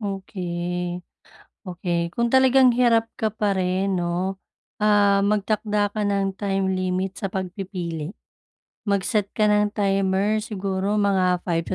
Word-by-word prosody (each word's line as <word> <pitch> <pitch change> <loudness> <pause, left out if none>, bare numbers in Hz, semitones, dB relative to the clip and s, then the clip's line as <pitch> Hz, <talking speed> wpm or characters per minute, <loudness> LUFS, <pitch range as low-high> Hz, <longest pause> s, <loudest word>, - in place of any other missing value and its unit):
okey. 180 -3 -4 0.6
Okey, 175 -1 -2
kung 235 +1 0
talagang 260 -1 +6
hirap 230 -2 +2
ka 220 - +2
pa 210 -1 -1
rin 190 +1 0
'no, 180 +3 -2 0.4
ah, 205 -1 +4
magtakda 205 0 0
ka 215 - -3
ng 200 -1 0
time 195 -1 -1
limit 185 +1 -2
sa 195 - -2
pagpipili. 180 -3 -5 0.7
Mag-set 200 +1 0
ka 215 -1 +3
ng 210 0 +2
timer, 195 +1 +1
siguro 200 -1 -2
mga 185 -3 +2
5 165 -2 -1
to - - -2
195 Hz, 130 wpm, -23 LUFS, 185-210 Hz, 0.7 s, talagang